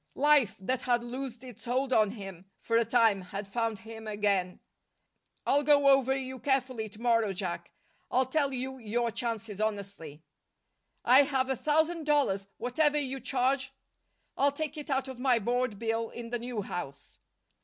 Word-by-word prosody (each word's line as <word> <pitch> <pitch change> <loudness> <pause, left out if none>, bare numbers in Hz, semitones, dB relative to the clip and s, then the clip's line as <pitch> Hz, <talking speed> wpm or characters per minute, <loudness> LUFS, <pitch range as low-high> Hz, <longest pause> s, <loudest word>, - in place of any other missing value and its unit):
Life, 290 -5 +4
that 255 +7 -1
had 240 -1 +1
loosed 250 0 -6
its 245 -3 -11
hold 260 +2 0
on 215 -3 +4
him 195 -3 -9
for 230 - -2
a 230 - +5
time, 225 -4 +3
had 195 +2 -6
found 225 +1 -1
him 225 0 -10
again. 200 -4 0 0.9
"I'll 285 - +3
go 285 -1 +5
over 270 -1 +4
you 260 -1 -5
carefully 255 -5 -1
to 210 +1 -15
morrow, 230 -4 +2
Jack. 180 -2 -4 0.4
I'll 260 +1 +2
tell 280 +1 0
you 265 0 -4
your 235 +1 -1
chances 225 -3 -4
honestly." 200 -8 -4 0.8
"I 255 +3 +8
have 265 -2 0
a - - +1
thousand 315 +4 +1
dollars. 235 -10 +2
Whatever 295 +5 +1
you 270 -2 -2
charge 265 +1 0 0.3
" - - -47
"I'll 280 +1 +4
take 305 +2 -4
it 295 -1 -7
out 265 -1 0
of 260 -2 -8
my 250 -2 +3
board 240 0 -1
bill 225 +1 -1
in 235 -1 -8
the 240 - -1
new 235 -3 -4
house!" 140 -7 -7
240 Hz, 170 wpm, -30 LUFS, 215-270 Hz, 0.9 s, I